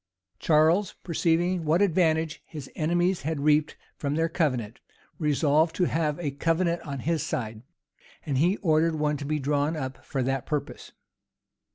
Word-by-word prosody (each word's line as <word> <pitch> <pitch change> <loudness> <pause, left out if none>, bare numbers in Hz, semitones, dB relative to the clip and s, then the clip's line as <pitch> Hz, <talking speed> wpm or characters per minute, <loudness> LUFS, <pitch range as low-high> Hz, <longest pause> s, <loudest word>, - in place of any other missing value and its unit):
Charles, 165 +5 +3
perceiving 170 +1 +1
what 160 +3 +2
advantage 160 -5 +1
his 150 -4 -9
enemies 175 +3 +1
had 155 0 -3
reaped 150 +1 +2 0.2
from 145 0 -2
their 165 +1 +1
covenant, 130 - -1 0.4
resolved 150 +1 +2
to 185 - +1
have 155 -3 0
a 150 -5 -2
covenant 170 +4 0
on 140 -5 -6
his 165 +1 0
side; 110 -4 -4 0.6
and 140 -3 0
he 180 +7 +3
ordered 160 -1 +3
one 150 -1 0
to 140 - -6
be 155 +1 0
drawn 145 +2 0
up 130 -3 -5
for 135 -2 -2
that 135 0 -2
purpose. 150 -2 -4
155 Hz, 155 wpm, -26 LUFS, 145-165 Hz, 0.6 s, Charles